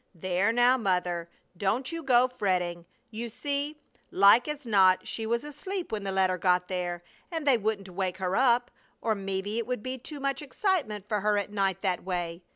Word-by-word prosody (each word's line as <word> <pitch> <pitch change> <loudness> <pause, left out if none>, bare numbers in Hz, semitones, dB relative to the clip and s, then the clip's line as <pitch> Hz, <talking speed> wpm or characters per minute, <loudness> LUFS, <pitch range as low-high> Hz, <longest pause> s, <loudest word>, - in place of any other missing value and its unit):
"There 185 +4 +1
now, 245 +2 +4
Mother! 180 -4 -1 0.3
Don't 215 - -1
you 330 0 -4
go 255 -3 +4
fretting! 180 -8 -1 0.2
You 230 +2 -5
see, 285 +5 -3 0.3
like 200 +7 +6
as 300 -2 -5
not 190 -4 +4
she 225 -1 -3
was 235 +3 0
asleep 340 +6 -5
when 215 -2 -2
the 195 - -2
letter 185 -1 +1
got 180 0 +2
there, 175 -2 -3 0.3
and 325 -4 -4
they 265 -5 +4
wouldn't 210 -2 -2
wake 185 0 -3
her 185 0 -1
up, 245 -1 +3 0.3
or 225 - +1
mebbe 195 -1 -3
it 220 +3 -2
would 250 -4 -3
be 255 0 -4
too 290 +4 -8
much 275 0 -1
excitement 275 - -1
for 210 -1 0
her 210 0 +2
at 205 0 -2
night 195 -2 0
that 185 -3 0
way! 175 -2 -3
210 Hz, 190 wpm, -28 LUFS, 185-255 Hz, 0.3 s, like